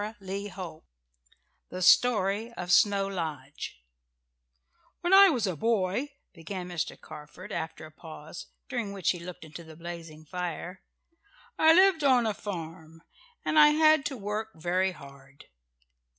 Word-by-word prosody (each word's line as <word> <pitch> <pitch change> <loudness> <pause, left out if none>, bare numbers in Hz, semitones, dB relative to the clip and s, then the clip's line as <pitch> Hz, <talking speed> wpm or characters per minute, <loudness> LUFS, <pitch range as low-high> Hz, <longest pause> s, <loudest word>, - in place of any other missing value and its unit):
CHAPTER 210 -2 -8
VII 190 -4 -6 0.9
THE 185 0 -4
STORY 215 +1 +3
OF 180 0 -4
SNOW 200 +1 +4
LODGE 150 - -6 1.2
"When 350 +2 +1
I 395 0 +9
was 250 - 0
a 185 -3 -2
boy," 220 - 0 0.2
began 180 +1 -7
Mr. 175 -3 -4
Carford 155 +6 -11
after 160 -3 -5
a 155 - -13
pause, 155 0 -10 0.2
during 235 -6 -3
which 195 -3 +1
he 175 - -5
looked 170 -1 -9
into 160 +2 -10
the 160 -1 -13
blazing 165 -2 -9
fire, 180 +2 -5 0.8
"I 320 0 +7
lived 370 -3 +5
on 255 -4 +4
a 215 - 0
farm, 165 -4 -8 0.4
and 310 - +3
I 300 - +9
had 310 -1 +4
to 270 - -6
work 215 +1 -4
very 180 +3 0
hard." 140 -2 -15
185 Hz, 140 wpm, -28 LUFS, 160-220 Hz, 1.2 s, I